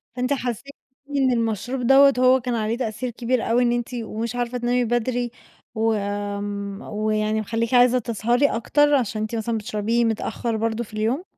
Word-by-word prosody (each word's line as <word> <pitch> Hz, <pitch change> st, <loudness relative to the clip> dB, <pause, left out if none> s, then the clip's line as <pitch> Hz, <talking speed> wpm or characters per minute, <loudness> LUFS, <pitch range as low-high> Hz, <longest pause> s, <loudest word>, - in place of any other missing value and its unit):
فأنتِ 250 Hz, +2 st, 0 dB
حسّيتِ 255 Hz, +1 st, -4 dB, 0.4 s
إن 265 Hz, -2 st, +3 dB
المشروب 235 Hz, +2 st, -1 dB
دَوّة 275 Hz, +1 st, +7 dB
هو 255 Hz, +1 st, +5 dB
كان 245 Hz, 0 st, -2 dB
عليه 220 Hz, +1 st, -1 dB
تأثير 240 Hz, 0 st, -3 dB
كبير 240 Hz, 0 st, -1 dB
أوي 245 Hz, +2 st, +3 dB
إن 240 Hz, -, +2 dB
إنتِ 240 Hz, -1 st, -2 dB
ومش 230 Hz, 0 st, -4 dB
عارفة 245 Hz, 0 st, -2 dB
تنامي 245 Hz, 0 st, +1 dB
بدري 240 Hz, +1 st, -1 dB, 0.4 s
و 225 Hz, 0 st, +2 dB
آمم، 205 Hz, 0 st, -4 dB
ويعني 215 Hz, 0 st, -1 dB
مخلّيكِ 225 Hz, +2 st, -2 dB
عايزة 250 Hz, 0 st, +5 dB
تسهَري 235 Hz, +3 st, +1 dB
أكتر 290 Hz, +5 st, +2 dB
عشان 225 Hz, -5 st, -1 dB
إنت 215 Hz, +2 st, -3 dB
مثلًا 225 Hz, 0 st, -1 dB
بتشربيه 220 Hz, +2 st, 0 dB
متأخر 225 Hz, +1 st, -2 dB
برضه 225 Hz, +1 st, -1 dB
في 215 Hz, -, -15 dB
اليوم؟ 225 Hz, +9 st, -1 dB
235 Hz, 170 wpm, -23 LUFS, 215-245 Hz, 0.4 s, دَوّة